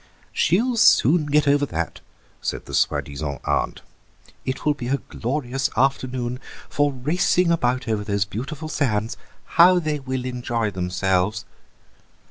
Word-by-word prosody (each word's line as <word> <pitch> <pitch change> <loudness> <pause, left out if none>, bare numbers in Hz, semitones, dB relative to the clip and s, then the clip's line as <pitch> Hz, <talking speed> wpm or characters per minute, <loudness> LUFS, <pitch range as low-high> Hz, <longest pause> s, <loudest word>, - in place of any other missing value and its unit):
"She'll 230 - +2
soon 155 - +5
get 145 0 +2
over 145 0 +4
that," 85 -4 -4 0.4
said - - -3
the - - -10
soi - - +2
disant 70 -1 -5
aunt; - - -1 0.6
"it 130 +1 -3
will 150 - +4
be 130 -4 -6
a 135 +2 +1
glorious 135 +1 -3
afternoon 125 -1 0 0.3
for 145 -1 +1
racing 170 +6 +1
about 125 -6 0
over 110 -2 0
those 100 -2 0
beautiful 135 - -6
sands. 115 -7 -1 0.5
How 180 +1 +8
they 155 -3 -1
will 130 -2 -4
enjoy 120 -3 -2
themselves!" 90 +1 0
130 Hz, 135 wpm, -23 LUFS, 110-150 Hz, 0.6 s, How